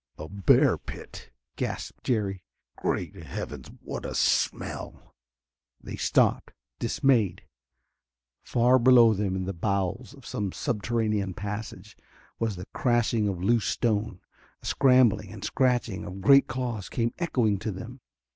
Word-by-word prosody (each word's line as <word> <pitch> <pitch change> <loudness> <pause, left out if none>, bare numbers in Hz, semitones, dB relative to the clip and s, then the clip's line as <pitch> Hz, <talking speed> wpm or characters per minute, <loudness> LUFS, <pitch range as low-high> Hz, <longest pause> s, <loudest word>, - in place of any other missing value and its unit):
"A 80 - -7
bear 100 +2 +3
pit," - - -10 0.3
gasped - - -5
Jerry. 100 -6 -1 0.3
"Great - - -2
Heavens! - - -7
What - - -6
a - - -5
smell!" - - -1 0.7
They - - -7
stopped, - - +1 0.3
dismayed. 115 -10 +1 1.0
Far 125 +2 +3
below 120 -2 +7
them 100 -2 -1
in 95 - -2
the 95 - -3
bowels 100 - -2
of 135 -5 -16
some 100 -3 -3
subterranean 105 -4 -1
passage 105 0 -6 0.4
was 115 -3 -1
the 90 +1 -8
crashing 120 -3 +1
of 90 -3 -3
loose 115 0 +2
stone; 105 -4 -1 0.4
a - - -12
scrambling 125 -6 +3
and 105 -3 -9
scratching 120 -8 0
of 95 +2 -7
great 140 +7 +6
claws 120 -5 -4
came 115 -1 -1
echoing 120 - +1
to 110 - -3
them. 120 +7 -9
110 Hz, 130 wpm, -27 LUFS, 100-120 Hz, 1.0 s, below